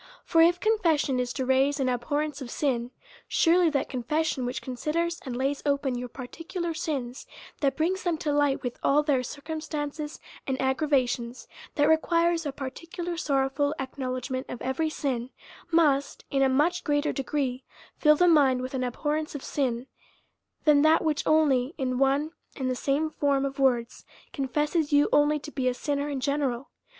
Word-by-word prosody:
For 330 - +4
if 345 +2 +5
con 440 +2 +2
fession 300 -7 +2
is 250 -1 -1
to 260 - -2
raise 270 +2 +2
an 265 - +1
abhorrence 290 +4 -1
of 255 - -6
sin, 245 -3 -1 0.4
surely 345 0 +4
that 285 -3 -1
confession 270 +1 -1
which 250 - -3
considers 315 +7 -2
and 250 - -3
lays 275 +2 -1
open 280 -2 0
your 245 0 -5
parti 255 +6 -9
cular 345 -1 -3
sins, 260 -6 -4 0.3
that 275 -2 +1
brings 360 +4 0
them 345 -3 0
to 300 -1 -2
light 290 -1 +1
with 245 -1 -4
all 295 +2 +3
their 285 -4 +2
cir 280 +3 -8
cumstances 305 -1 -4 0.3
and 265 -1 -1
aggravations, 260 -3 0 0.3
that 290 0 +3
requires 335 +1 +2
a - - -2
particular 335 +6 -6
sorrowful 285 -1 0
acknowledgement 260 -1 -4
of 245 - -6
every 265 +5 0
sin, 255 -6 -2 0.4
must, 300 -5 +2
in 275 - +1
a 270 - +4
much 310 +7 +2
g 295 - 0
reater 290 +1 +1
degree, 270 -2 -2 0.4
fill 300 -1 +6
the 355 +4 +4
mind 270 -6 +4
with 255 - -5
an 260 -1 -1
abhorrence 300 +5 -2
of 285 - -6
sin, 250 -4 -1 0.8
than 300 -2 +5
that 315 +2 +4
which 310 -3 +1
only 290 -3 +3
in 255 -3 -1
one 275 +3 +2 0.2
and 260 -2 -1
the - - -1
same 290 +5 0
form 280 -2 +1
of 275 0 -5
words 245 -3 +1 0.3
confesses 295 +2 0
you 290 0 +5
only 295 +1 +4
to 300 +1 -9
be 260 -3 -1
a 250 - +1
sinner 285 +1 -2
in 280 -2 -2
general. 275 -2 -1
285 Hz, 180 wpm, -27 LUFS, 260-310 Hz, 0.8 s, fill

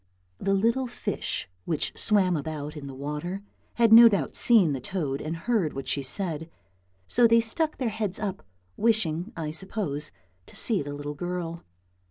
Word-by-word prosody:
The 195 0 +1
little 230 +6 +1
fish 240 - -4 0.2
which 155 - -2
swam 195 -5 +3
about 150 0 -5
in 145 -2 -7
the 135 - -8
water, 150 +8 -5 0.3
had 230 -2 +4
no 230 +1 +11
doubt 190 -10 -1
seen 205 -11 +4
the 135 - -4
toad 145 -5 -3
and 160 +2 -4
heard 185 -3 0
what 135 0 -6
she 140 - 0
said, 160 +2 -1 0.6
so 240 -1 +4
they 230 0 +5
stuck 310 +8 -1
their 250 -4 -1
heads 210 -3 -2
up, 200 -3 -3 0.4
wishing, 210 -4 +1
I 155 -2 -3
suppose, 160 -4 -2 0.4
to - - -13
see 220 -8 +4
the 145 0 -5
little 145 0 -5
girl. 170 +1 -4
180 Hz, 170 wpm, -26 LUFS, 150-220 Hz, 0.6 s, no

